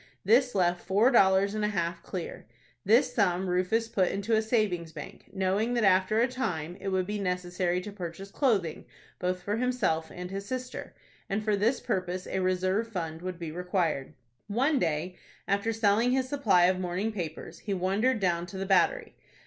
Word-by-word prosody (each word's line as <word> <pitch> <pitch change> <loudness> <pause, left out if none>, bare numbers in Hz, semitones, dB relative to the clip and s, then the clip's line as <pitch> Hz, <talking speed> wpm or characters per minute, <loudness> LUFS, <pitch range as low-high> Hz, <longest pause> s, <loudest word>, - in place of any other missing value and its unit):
This 245 +4 +4
left 175 -2 +2
four 205 +7 +3
dollars 195 -3 +4
and 215 0 -2
a - - +3
half 170 -4 -2
clear. 180 - -6 0.4
This 245 +5 +4
sum 190 -4 +1
Rufus 185 +6 +1
put 190 -5 +1
into 200 +3 -2
a 220 - +3
savings 210 -7 0
bank, 150 -2 -10
knowing 195 +5 0
that 235 - +1
after 190 +2 +4
a 240 - +4
time 180 -11 -3
it 195 - -5
would 190 -1 +1
be 210 +2 -3
necessary 180 -1 -1
to 205 - -7
purchase 190 0 -7
clothing 200 - 0 0.3
both 180 0 -2
for 205 +3 -1
himself 240 -11 0
and 180 +1 -7
his 195 +1 -5
sister, 255 0 -5 0.3
and 210 +2 -1
for 210 -1 +2
this 225 +6 +1
purpose 185 -4 -2
a 190 - -2
reserve 185 +4 +1
fund 165 -6 -5
would 185 -1 -5
be 165 -2 -5
required. 175 -5 -1 0.3
One 265 +7 +2
day, 165 +2 -1 0.3
after 200 +3 +1
selling 225 +2 +2
his 260 -1 +1
supply 225 -11 +3
of 185 +1 +2
morning 185 +4 -1
papers, 170 -7 -6
he 200 -2 -3
wandered 205 +7 +1
down 175 -3 0
to 190 - -8
the 195 - -3
Battery. 320 - +2
195 Hz, 180 wpm, -29 LUFS, 180-220 Hz, 0.4 s, This